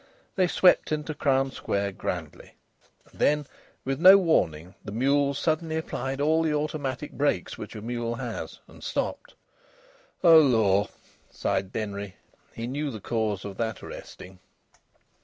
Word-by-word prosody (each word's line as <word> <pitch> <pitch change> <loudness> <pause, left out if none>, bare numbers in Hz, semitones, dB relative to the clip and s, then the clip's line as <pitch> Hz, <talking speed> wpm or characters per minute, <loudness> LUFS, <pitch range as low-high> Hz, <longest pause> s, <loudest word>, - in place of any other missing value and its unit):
They 185 -2 +3
swept 180 -1 +4
into 155 0 -2
Crown 135 -2 +1
Square 100 -5 -2
grandly. 95 - -6 0.6
And - - -19
then, 150 -1 +2 0.4
with 135 +1 -2
no 190 +2 +10
warning, 90 - +1
the 100 - -7
mule 140 +5 +2
suddenly 160 +2 -1
applied 135 -4 -4
all 155 +3 +3
the 155 -2 +1
automatic 150 -2 -3
brakes 140 -11 -1
which - - -9
a 105 - -7
mule 120 0 -3
has, 120 -2 -6
and - - -15
stopped. - - -3 0.9
"Oh 165 -2 +9
Lor!" 110 -8 +3 0.4
sighed 95 0 -2
Denry. 100 -3 -5 0.4
He 115 - -6
knew 145 +4 -3
the 110 -5 -6
cause 105 -2 -2
of 100 -1 -7
that 110 -2 -3
arresting. 90 0 -10
135 Hz, 140 wpm, -26 LUFS, 105-150 Hz, 0.9 s, no